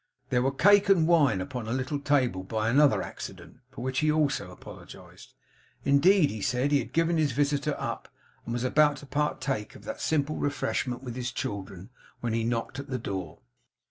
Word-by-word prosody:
There 125 Hz, -1 st, +3 dB
were 130 Hz, -, +2 dB
cake 205 Hz, +8 st, +5 dB
and 170 Hz, -5 st, +5 dB
wine 145 Hz, -, +4 dB
upon 120 Hz, +3 st, -5 dB
a -, -, -3 dB
little 130 Hz, +3 st, -2 dB
table 135 Hz, -9 st, +1 dB
by 110 Hz, +3 st, -1 dB
another 145 Hz, +2 st, +4 dB
accident, -, -, -9 dB
for -, -, -10 dB
which 130 Hz, 0 st, -1 dB
he 155 Hz, 0 st, +2 dB
also 145 Hz, -11 st, 0 dB
apologised. 90 Hz, -, -13 dB, 0.5 s
Indeed 150 Hz, +4 st, +5 dB
he 110 Hz, -, -6 dB
said, 125 Hz, +7 st, 0 dB
he 145 Hz, -, +4 dB
had 120 Hz, -, -6 dB
given 165 Hz, 0 st, +2 dB
his 150 Hz, -4 st, +1 dB
visitor 145 Hz, +2 st, 0 dB
up, -, -, -5 dB, 0.3 s
and 115 Hz, -, -6 dB
was 120 Hz, 0 st, -2 dB
about 145 Hz, +3 st, +3 dB
to 145 Hz, -, -11 dB
partake 140 Hz, -5 st, -2 dB
of -, -, -13 dB
that -, -, -6 dB
simple 155 Hz, -1 st, 0 dB
refreshment 135 Hz, -3 st, -2 dB
with 120 Hz, -3 st, -6 dB
his 125 Hz, -1 st, -3 dB
children, 100 Hz, -2 st, -6 dB, 0.3 s
when 115 Hz, -2 st, -2 dB
he 115 Hz, 0 st, 0 dB
knocked 115 Hz, +3 st, -2 dB
at 140 Hz, -, -7 dB
the 130 Hz, -, -1 dB
door. 95 Hz, -8 st, -5 dB
135 Hz, 190 wpm, -28 LUFS, 115-150 Hz, 0.5 s, cake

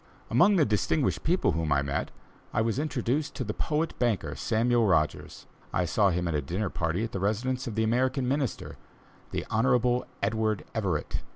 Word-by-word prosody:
Among 175 Hz, -, +5 dB
the 160 Hz, -5 st, +4 dB
distinguished 115 Hz, +7 st, +1 dB
people 180 Hz, +3 st, +2 dB
whom 80 Hz, -2 st, -1 dB
I 70 Hz, 0 st, +3 dB
met, 70 Hz, 0 st, -2 dB, 0.5 s
I -, -, +3 dB
was 115 Hz, +3 st, 0 dB
introduced 145 Hz, 0 st, -1 dB
to -, -, -2 dB
the 105 Hz, -2 st, -3 dB
poet 155 Hz, +7 st, -1 dB
banker, 120 Hz, -5 st, 0 dB
Samuel 115 Hz, 0 st, +2 dB
Rogers. 80 Hz, -5 st, 0 dB, 0.3 s
I 90 Hz, -, +1 dB
saw 100 Hz, +4 st, +3 dB
him 90 Hz, 0 st, -1 dB
at 85 Hz, -, -1 dB
a 75 Hz, -, +1 dB
dinner 90 Hz, +8 st, -3 dB
party 85 Hz, +5 st, -1 dB
at 115 Hz, -, -3 dB
the 95 Hz, -, -3 dB
residence 125 Hz, +7 st, -1 dB
of 110 Hz, -, -4 dB
the 110 Hz, -, +1 dB
American 125 Hz, +3 st, +1 dB
Minister, 135 Hz, -1 st, -2 dB, 0.5 s
the -, -, -3 dB
Honorable 125 Hz, +1 st, +2 dB, 0.2 s
Edward 110 Hz, 0 st, 0 dB
Everett. 95 Hz, -9 st, -1 dB
110 Hz, 180 wpm, -28 LUFS, 95-130 Hz, 0.5 s, Among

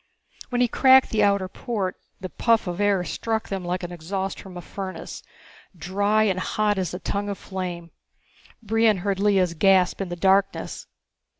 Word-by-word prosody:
When 245 Hz, -1 st, 0 dB
he 245 Hz, -, +4 dB
cracked 260 Hz, +2 st, +5 dB
the 220 Hz, -, +1 dB
outer 200 Hz, -2 st, +2 dB
port 195 Hz, -1 st, -3 dB, 0.2 s
the 185 Hz, -, -6 dB
puff 230 Hz, +3 st, +2 dB
of 180 Hz, +2 st, -3 dB
air 200 Hz, -3 st, +2 dB
struck 220 Hz, +4 st, -3 dB
them 195 Hz, -2 st, -3 dB
like 180 Hz, +1 st, -2 dB
the 175 Hz, 0 st, -6 dB
exhaust 190 Hz, +3 st, -4 dB
from 185 Hz, -2 st, -10 dB
a -, -, -6 dB
furnace, 190 Hz, +1 st, -7 dB, 0.6 s
dry 200 Hz, +5 st, +1 dB
and 190 Hz, -3 st, +1 dB
hot 210 Hz, +1 st, 0 dB
as 185 Hz, -, -2 dB
a -, -, -5 dB
tongue 205 Hz, +1 st, -3 dB
of 200 Hz, -, -4 dB
flame. 175 Hz, -3 st, -6 dB, 0.7 s
Brion 225 Hz, -1 st, +3 dB
heard 200 Hz, -1 st, 0 dB
Lea's 195 Hz, -4 st, +2 dB
gasp 185 Hz, +2 st, +3 dB
in 190 Hz, -, -3 dB
the 175 Hz, -, -4 dB
darkness. 195 Hz, +2 st, +1 dB
195 Hz, 175 wpm, -24 LUFS, 185-210 Hz, 0.7 s, cracked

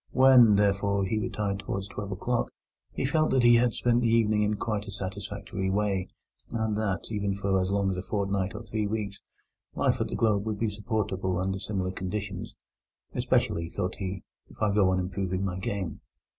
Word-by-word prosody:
When, 130 Hz, -5 st, +7 dB
therefore, 100 Hz, -1 st, +2 dB
he 110 Hz, +3 st, 0 dB
retired 100 Hz, -2 st, -2 dB
towards 95 Hz, -1 st, -4 dB
twelve 100 Hz, 0 st, -6 dB
o'clock, 120 Hz, +6 st, -1 dB, 0.4 s
he -, -, -2 dB
felt 155 Hz, +3 st, +2 dB
that 130 Hz, -2 st, +3 dB
he 120 Hz, 0 st, +7 dB
had 120 Hz, -1 st, +2 dB
spent 120 Hz, 0 st, +2 dB
his 115 Hz, -, +3 dB
evening 110 Hz, -2 st, +3 dB
in 105 Hz, 0 st, +1 dB
quite 105 Hz, -1 st, -2 dB
a -, -, -5 dB
satisfactory 95 Hz, 0 st, -4 dB
way, 100 Hz, -1 st, 0 dB, 0.4 s
and 110 Hz, -2 st, -1 dB
that, 105 Hz, -2 st, -2 dB
even 100 Hz, -2 st, -1 dB
for 95 Hz, -1 st, +1 dB
so 95 Hz, -, -2 dB
long 100 Hz, -1 st, +1 dB
as 90 Hz, -, -3 dB
a -, -, -2 dB
fortnight 100 Hz, -1 st, -1 dB
or -, -, -6 dB
three 110 Hz, -1 st, -2 dB
weeks, 100 Hz, -2 st, -3 dB, 0.5 s
life -, -, +1 dB
at -, -, 0 dB
the -, -, -4 dB
Globe 105 Hz, -3 st, +2 dB
would 110 Hz, -2 st, -1 dB
be 110 Hz, 0 st, 0 dB
supportable 100 Hz, -4 st, -1 dB
under 95 Hz, +1 st, -1 dB
similar 95 Hz, -2 st, -2 dB
conditions—"especially," 95 Hz, -3 st, -3 dB
thought 90 Hz, +1 st, -3 dB
he, 95 Hz, -2 st, -4 dB, 0.3 s
"if -, -, -17 dB
I 105 Hz, -2 st, +2 dB
go 100 Hz, -2 st, +4 dB
on 95 Hz, 0 st, +2 dB
improving 95 Hz, 0 st, -2 dB
my 95 Hz, -1 st, -3 dB
game." 95 Hz, -4 st, -3 dB
100 Hz, 185 wpm, -28 LUFS, 95-110 Hz, 0.5 s, When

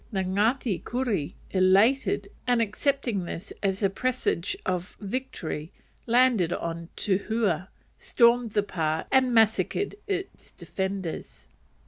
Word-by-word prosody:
The 190 Hz, -3 st, 0 dB
Ngati 205 Hz, +3 st, 0 dB
Kuri, 230 Hz, -, -2 dB, 0.2 s
elated, 200 Hz, +3 st, +3 dB, 0.2 s
and 245 Hz, -1 st, +3 dB
accepting 230 Hz, -2 st, 0 dB
this 170 Hz, +2 st, -7 dB
as 195 Hz, 0 st, -1 dB
a 195 Hz, -, +4 dB
presage 245 Hz, -6 st, -1 dB
of 180 Hz, 0 st, -3 dB
victory, 195 Hz, -8 st, -4 dB, 0.4 s
landed 235 Hz, -7 st, +4 dB
on 170 Hz, 0 st, -4 dB
Tuhua, 200 Hz, -3 st, 0 dB, 0.3 s
stormed 235 Hz, -2 st, +3 dB
the 205 Hz, -, +2 dB
pa, 160 Hz, -5 st, -1 dB
and 260 Hz, -1 st, +4 dB
massacred 225 Hz, -, +2 dB
its 390 Hz, -1 st, -4 dB
defenders. 190 Hz, -3 st, -5 dB
205 Hz, 110 wpm, -27 LUFS, 185-245 Hz, 0.4 s, a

